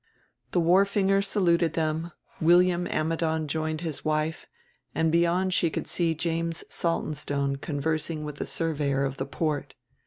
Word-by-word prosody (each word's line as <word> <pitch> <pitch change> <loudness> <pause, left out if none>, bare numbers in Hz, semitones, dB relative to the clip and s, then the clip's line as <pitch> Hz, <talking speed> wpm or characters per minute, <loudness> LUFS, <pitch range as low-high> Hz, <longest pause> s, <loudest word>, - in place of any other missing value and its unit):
The 180 - +1
wharfinger 195 +3 +3
saluted 170 -5 +2
them, 160 +1 -1 0.3
William 175 +1 +4
Ammidon 160 0 0
joined 155 +1 -2
his 160 -4 -4
wife, 155 +1 -1 0.5
and 160 0 +2
beyond 175 +3 +2
she 170 - +3
could - - -3
see 165 -2 0
James 165 +1 -2
Saltonstone 145 -4 -1
conversing 155 +2 -2
with 150 -1 -6
the - - -4
Surveyor 145 -4 0
of 135 0 -3
the 135 - -3
Port. 150 0 -2
160 Hz, 135 wpm, -27 LUFS, 155-170 Hz, 0.5 s, William